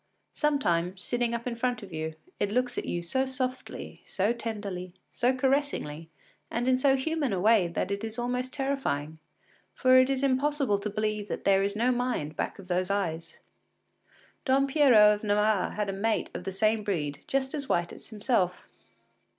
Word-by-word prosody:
Sometimes, 185 Hz, -, +1 dB
sitting 240 Hz, -1 st, 0 dB
up 235 Hz, -, -5 dB
in 245 Hz, -2 st, -2 dB
front 245 Hz, -1 st, -1 dB
of 190 Hz, -4 st, -10 dB
you, 160 Hz, 0 st, -4 dB, 0.2 s
it 205 Hz, -, +1 dB
looks 245 Hz, +3 st, 0 dB
at -, -, -3 dB
you 175 Hz, 0 st, -2 dB
so 260 Hz, +10 st, 0 dB
softly, 260 Hz, -1 st, -4 dB
so 200 Hz, +4 st, 0 dB
tenderly, 205 Hz, -6 st, -5 dB, 0.2 s
so 245 Hz, +1 st, +2 dB
caressingly, 260 Hz, -, -1 dB, 0.4 s
and 240 Hz, +2 st, -2 dB
in 255 Hz, 0 st, +3 dB
so 270 Hz, 0 st, +4 dB
human 290 Hz, -1 st, -1 dB
a 190 Hz, -, 0 dB
way 210 Hz, -2 st, +4 dB
that 170 Hz, +3 st, -2 dB
it 200 Hz, +1 st, -2 dB
is 225 Hz, +1 st, -4 dB
almost 250 Hz, +1 st, -2 dB
terrifying, 265 Hz, -, -2 dB, 0.6 s
for 255 Hz, -1 st, +4 dB
it 255 Hz, +1 st, +5 dB
is 270 Hz, 0 st, 0 dB
impossible 275 Hz, -4 st, +2 dB
to 210 Hz, -, -3 dB
believe 215 Hz, 0 st, -2 dB
that -, -, -4 dB
there 195 Hz, 0 st, +4 dB
is 200 Hz, +1 st, 0 dB
no 240 Hz, +4 st, +2 dB
mind 245 Hz, -12 st, -1 dB
back -, -, -3 dB
of 195 Hz, -, -12 dB
those 180 Hz, +1 st, 0 dB
eyes. 170 Hz, -5 st, -2 dB, 1.1 s
Don 270 Hz, +1 st, +3 dB
Pierrot 245 Hz, -8 st, +6 dB
of 205 Hz, -, -17 dB
Navarre 210 Hz, -1 st, +2 dB
had 210 Hz, -1 st, -2 dB
a 195 Hz, -, -2 dB
mate 215 Hz, +3 st, -1 dB
of -, -, -6 dB
the 195 Hz, -, -2 dB
same 215 Hz, +3 st, +2 dB
breed 150 Hz, -8 st, -2 dB
just 270 Hz, -1 st, 0 dB
as 285 Hz, -3 st, -4 dB
white 170 Hz, 0 st, 0 dB
as -, -, -13 dB
himself. 210 Hz, -5 st, 0 dB
220 Hz, 185 wpm, -28 LUFS, 195-255 Hz, 1.1 s, Pierrot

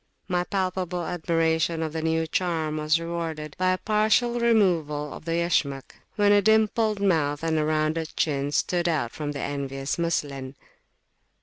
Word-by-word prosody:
My 180 Hz, -2 st, 0 dB
palpable 185 Hz, -2 st, -2 dB
admiration 165 Hz, -1 st, 0 dB
of 155 Hz, -1 st, -4 dB
the 160 Hz, -, -2 dB
new 160 Hz, 0 st, 0 dB
charm 160 Hz, -3 st, -1 dB
was 155 Hz, +1 st, +2 dB
rewarded 165 Hz, -3 st, -4 dB
by 185 Hz, 0 st, +2 dB
a -, -, -1 dB
partial 220 Hz, +4 st, +2 dB
removal 170 Hz, -11 st, +2 dB
of -, -, -10 dB
the 165 Hz, -, -1 dB
Yashmak, 160 Hz, -5 st, 0 dB, 0.2 s
when 205 Hz, -1 st, +4 dB
a 205 Hz, 0 st, +6 dB
dimpled 220 Hz, 0 st, +2 dB
mouth 160 Hz, -7 st, +1 dB
and 160 Hz, -1 st, +1 dB
a -, -, +1 dB
rounded 155 Hz, +1 st, -1 dB
chin 140 Hz, -2 st, 0 dB
stood 175 Hz, +3 st, +1 dB
out 145 Hz, -8 st, -1 dB
from 150 Hz, -2 st, -4 dB
the 140 Hz, -, -5 dB
envious 140 Hz, +1 st, -3 dB
muslin. 140 Hz, -5 st, -2 dB
165 Hz, 160 wpm, -25 LUFS, 150-185 Hz, 0.2 s, a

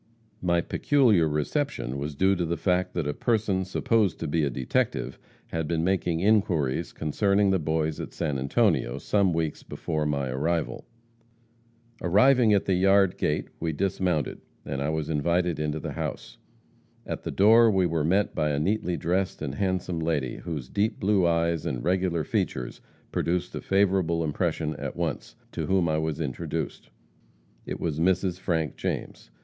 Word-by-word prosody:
My 85 Hz, -1 st, +2 dB
peculiar 110 Hz, -, +3 dB
reception 75 Hz, -, -2 dB
was 75 Hz, +1 st, -4 dB
due 95 Hz, +6 st, +3 dB
to 90 Hz, -, -1 dB
the 85 Hz, 0 st, -1 dB
fact 90 Hz, -1 st, 0 dB
that 85 Hz, -4 st, -1 dB
a 75 Hz, -, -1 dB
person 105 Hz, -1 st, 0 dB
supposed 100 Hz, 0 st, +1 dB
to 80 Hz, -, -2 dB
be 80 Hz, +2 st, +1 dB
a 70 Hz, -, +1 dB
detective, 65 Hz, -1 st, -1 dB, 0.3 s
had 80 Hz, -2 st, -2 dB
been 80 Hz, 0 st, 0 dB
making 90 Hz, -2 st, 0 dB
inquiries 85 Hz, -8 st, +1 dB
concerning 100 Hz, +6 st, +1 dB
the 95 Hz, -, +2 dB
Boys 80 Hz, 0 st, -1 dB
at -, -, -6 dB
San 75 Hz, -5 st, -2 dB
Antonio, 65 Hz, -1 st, +1 dB
some 100 Hz, +5 st, +1 dB
weeks 80 Hz, -2 st, -2 dB
before 75 Hz, -2 st, -3 dB
my 70 Hz, -2 st, -1 dB
arrival. 80 Hz, +6 st, -1 dB, 1.2 s
"Arriving 110 Hz, +6 st, +4 dB
at 100 Hz, -2 st, +3 dB
the 95 Hz, -, +1 dB
yard 95 Hz, +1 st, +4 dB
gate, -, -, -1 dB
we 80 Hz, -1 st, -1 dB
dismounted, 90 Hz, -3 st, -1 dB, 0.2 s
and 70 Hz, 0 st, -3 dB
I 70 Hz, -, 0 dB
was 80 Hz, -1 st, -2 dB
invited 85 Hz, +2 st, 0 dB
into 75 Hz, 0 st, -1 dB
the -, -, -5 dB
house. -, -, -5 dB, 0.7 s
At -, -, -4 dB
the -, -, -5 dB
door 115 Hz, +3 st, +6 dB
we 95 Hz, -3 st, +2 dB
were 80 Hz, -3 st, 0 dB
met 95 Hz, +6 st, +2 dB
by 75 Hz, -, 0 dB
a 70 Hz, -1 st, 0 dB
neatly 90 Hz, +1 st, 0 dB
dressed 90 Hz, +3 st, -1 dB
and 70 Hz, -3 st, -4 dB
handsome 90 Hz, 0 st, -1 dB
lady, 80 Hz, -6 st, -1 dB
whose 75 Hz, -8 st, -5 dB
deep 105 Hz, -, -1 dB
blue 95 Hz, -3 st, +3 dB
eyes 85 Hz, -1 st, +1 dB
and -, -, -3 dB
regular 90 Hz, -2 st, +1 dB
features 65 Hz, -3 st, -2 dB, 0.3 s
produced 90 Hz, +1 st, -1 dB
a -, -, -4 dB
favorable 95 Hz, -4 st, +2 dB
impression 80 Hz, 0 st, -1 dB
at -, -, -5 dB
once, -, -, -3 dB, 0.2 s
to -, -, -4 dB
whom 95 Hz, -3 st, +2 dB
I 80 Hz, 0 st, +1 dB
was 80 Hz, -1 st, -2 dB
introduced. 70 Hz, -6 st, -4 dB, 0.8 s
It -, -, -4 dB
was 80 Hz, -2 st, -2 dB
Mrs. 90 Hz, +1 st, +1 dB
Frank 80 Hz, -6 st, -1 dB
James. -, -, -4 dB
85 Hz, 165 wpm, -26 LUFS, 75-95 Hz, 1.2 s, door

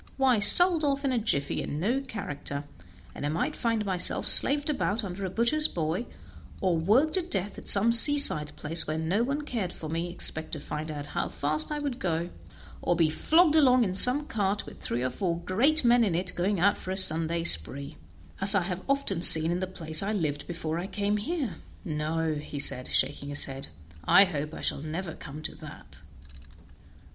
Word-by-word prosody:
Why, 260 Hz, -4 st, +1 dB
sold 340 Hz, -, +7 dB
off 280 Hz, -1 st, -2 dB
in 270 Hz, -, -1 dB
a 250 Hz, -, -1 dB
jiffy, 140 Hz, -10 st, -3 dB
and 145 Hz, -, -6 dB
no 240 Hz, +10 st, -2 dB
character, 145 Hz, -, -7 dB, 0.5 s
and -, -, -10 dB
I 145 Hz, -, -2 dB
might 160 Hz, +3 st, -4 dB
find 230 Hz, -2 st, -3 dB
myself 185 Hz, -2 st, 0 dB
slaved 290 Hz, +1 st, +3 dB
about 230 Hz, -7 st, -3 dB
under 195 Hz, 0 st, -7 dB
a -, -, -5 dB
butcher's 235 Hz, -, 0 dB
boy, 165 Hz, +7 st, -5 dB, 0.5 s
or 185 Hz, -3 st, -1 dB
worked 220 Hz, -, 0 dB
to 375 Hz, -, +4 dB
death 200 Hz, -, -5 dB
at -, -, -14 dB
some 215 Hz, +4 st, +4 dB
seaside 235 Hz, -, +4 dB
place 160 Hz, +2 st, +1 dB
where 155 Hz, +1 st, -4 dB
no 165 Hz, +7 st, -2 dB
one 280 Hz, +5 st, -3 dB
cared 225 Hz, -11 st, -5 dB
for 155 Hz, -, -10 dB
me, 165 Hz, +2 st, -4 dB
except 160 Hz, -2 st, 0 dB
to 155 Hz, -, -5 dB
find 150 Hz, +2 st, -8 dB
out 145 Hz, -2 st, -7 dB
how -, -, -3 dB
fast 155 Hz, -, -2 dB
I 300 Hz, -, -4 dB
could 280 Hz, -4 st, -6 dB
go, 170 Hz, -1 st, -4 dB, 0.5 s
or 175 Hz, -, -1 dB
be 160 Hz, -2 st, 0 dB
flogged 320 Hz, -, +1 dB
along 255 Hz, -5 st, +3 dB
in 190 Hz, -4 st, -3 dB
some 250 Hz, +9 st, +5 dB
cart 205 Hz, -5 st, -3 dB
with -, -, -14 dB
three 120 Hz, +2 st, -5 dB
or 130 Hz, -, -3 dB
four 170 Hz, +4 st, -4 dB
great 255 Hz, -, 0 dB
men 240 Hz, 0 st, +3 dB
in 190 Hz, -6 st, -2 dB
it 180 Hz, +1 st, -2 dB
going 190 Hz, +2 st, -3 dB
out 200 Hz, +4 st, +1 dB
for -, -, -10 dB
a 190 Hz, -, 0 dB
Sunday 165 Hz, -2 st, +4 dB
spree, 130 Hz, -, +5 dB, 0.5 s
as 195 Hz, +1 st, +11 dB
I 195 Hz, -, +1 dB
have 180 Hz, 0 st, -6 dB
often 275 Hz, -11 st, -2 dB
seen 160 Hz, -1 st, +4 dB
in 175 Hz, -, -3 dB
the 185 Hz, -, -4 dB
place 160 Hz, -4 st, 0 dB
I 205 Hz, +2 st, -3 dB
lived 150 Hz, -7 st, -3 dB
in -, -, -16 dB
before 165 Hz, -1 st, -6 dB
I 180 Hz, -, -6 dB
came 205 Hz, 0 st, -3 dB
here; 275 Hz, +4 st, -5 dB, 0.3 s
no," 155 Hz, -1 st, -4 dB, 0.2 s
said 130 Hz, -2 st, +1 dB
he, -, -, -9 dB
shaking 140 Hz, +1 st, -2 dB
his 145 Hz, -, +1 dB
head, 135 Hz, 0 st, -7 dB, 0.4 s
"I 195 Hz, -, +5 dB
hope 150 Hz, -3 st, -6 dB
I -, -, -10 dB
shall -, -, -3 dB
never 160 Hz, +2 st, -7 dB
come 150 Hz, +2 st, -12 dB
to -, -, -6 dB
that." -, -, -10 dB
185 Hz, 205 wpm, -26 LUFS, 155-235 Hz, 0.5 s, as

